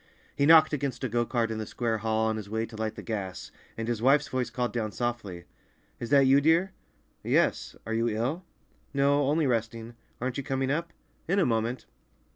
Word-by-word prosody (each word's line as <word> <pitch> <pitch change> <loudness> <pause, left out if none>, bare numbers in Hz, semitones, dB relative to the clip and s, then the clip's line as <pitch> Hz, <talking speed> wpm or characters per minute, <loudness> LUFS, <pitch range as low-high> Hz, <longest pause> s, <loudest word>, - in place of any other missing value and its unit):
He 140 - +2
knocked 160 -1 +7
against 140 -3 -3
a - - +1
go 120 +1 0
cart 115 -2 0
in 110 - -3
the 110 - -5
square 115 -2 -2
hall 110 +1 0
on 110 0 -1
his 105 -2 -7
way 110 +1 -1
to 115 - -12
light 110 0 -3
the - - -8
gas, 100 -6 -5 0.3
and 115 0 -3
his 120 -2 -2
wife's 140 +3 +4
voice 130 -2 -2
called 125 -1 -2
down 110 -3 -2
softly, 105 -7 -4 0.6
"Is 120 - -5
that 140 -1 +5
you, 135 +2 +5
dear?" 165 +5 +3 0.5
"Yes. - - +1
Are 115 - -3
you 115 +1 +1
ill?" 125 +11 -2 0.5
"No, 140 0 +3
only 155 +2 +2
resting. 115 -1 -2 0.3
Aren't 125 +1 -3
you - - -4
coming 135 0 -1
up?" 165 +3 -2 0.4
"In 195 +4 +1
a 195 - +4
moment." 115 +1 -1
120 Hz, 205 wpm, -28 LUFS, 110-140 Hz, 0.6 s, knocked